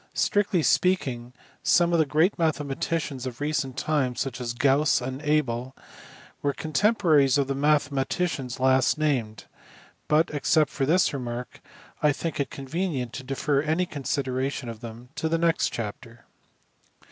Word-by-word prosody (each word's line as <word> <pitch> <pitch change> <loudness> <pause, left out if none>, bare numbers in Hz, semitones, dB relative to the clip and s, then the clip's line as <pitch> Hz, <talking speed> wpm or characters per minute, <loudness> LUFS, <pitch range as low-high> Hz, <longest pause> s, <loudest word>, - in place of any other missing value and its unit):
Strictly 200 -5 +1
speaking 130 -12 +1 0.3
some 175 0 +3
of 170 - +3
the 155 - +3
great 160 +7 +2
mathe 160 -3 +1
maticians 140 -1 -3
of 120 -2 -7
recent 145 -3 -2
times, 135 -5 0
such 130 -2 -3
as 120 -1 -3
Gauss 140 +3 +3
and 130 +2 -5
Abel, 135 -4 0 0.7
were 140 -1 0
con 155 +2 -7
temporaries 155 - +4
of 140 - +2
the 135 - -2
mathematicians 140 -1 0
last 130 +2 +3
named; 130 -8 -1 0.6
but, 155 +2 +3
except 150 +1 +2
for 135 -2 -1
this 170 +1 +3
remark, 125 -2 -5 0.4
I 150 -1 +4
think 165 +1 -4
it 140 - -1
convenient 140 -3 -3
to 135 - -6
defer 140 +2 0
any 160 +4 0
consideration 135 -3 -3
of 115 -1 -7
them 120 +1 -10
to 160 - -1
the 165 - +1
next 165 0 +2
chapter. 115 +1 -7
140 Hz, 150 wpm, -26 LUFS, 130-155 Hz, 0.7 s, temporaries